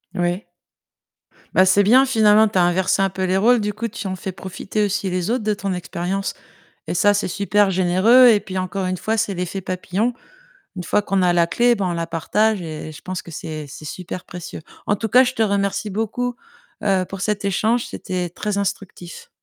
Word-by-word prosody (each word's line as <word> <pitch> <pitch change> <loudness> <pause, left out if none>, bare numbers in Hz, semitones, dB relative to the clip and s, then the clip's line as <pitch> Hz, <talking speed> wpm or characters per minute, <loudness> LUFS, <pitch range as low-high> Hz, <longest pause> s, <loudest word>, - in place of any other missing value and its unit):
Oui. 175 +1 -1 1.1
Bah 185 - +5
c'est 200 +2 +4
bien! 255 +6 +6
Finalement 220 -3 +5
tu 205 -3 -3
as - - +5
inversé 180 +2 +2
un 195 - +2
peu 190 +1 -4
les 185 +1 +1
rôles 235 +3 +4
du 205 0 -2
coup, 230 +3 -3
tu 220 -2 -6
en 185 - -3
fais 190 +1 -5
profiter 190 +3 -4
aussi 200 -1 -1
les 180 +2 -2
autres 245 -3 -1
de 215 0 +1
ton 195 -1 -3
expérience 180 +2 -3 0.5
et - - -3
ça, 205 +4 +4
c'est 200 - -1
super 200 +2 +2
généreux 190 +8 +5
et 210 -3 +5
puis, 190 -2 -8
encore 185 +1 -2
une 185 0 -1
fois, 220 +4 -2
c'est 210 -3 0
l'effet 180 +2 -4
papillon. 190 +5 -2 0.6
Une 180 - -5
fois 210 +4 +1
qu'on 195 -2 0
a 175 -1 +3
la 170 -1 +3
clé, 240 +6 +3
bah, 200 -4 -2
on 175 - -1
la 170 0 -2
partage 205 +5 0
et 155 -1 -6
je 155 - -12
pense 185 -1 -5
que 170 - -11
c'est 155 -1 -6
c'est 155 +2 -11
super 180 +3 -7
précieux. 175 -2 -8 0.3
En 205 - +2
tout 225 - -3
cas, 255 +4 +6
je 245 - -1
te - - -2
remercie 200 0 0
beaucoup, 225 +4 -2 0.5
heu, 190 -2 +2
pour 195 -1 -7
cet 210 -1 -1
échange. 220 +5 +1
C'était 180 -2 -4
très 205 +3 -3
instructif. 195 - -5
195 Hz, 215 wpm, -21 LUFS, 180-210 Hz, 1.1 s, bien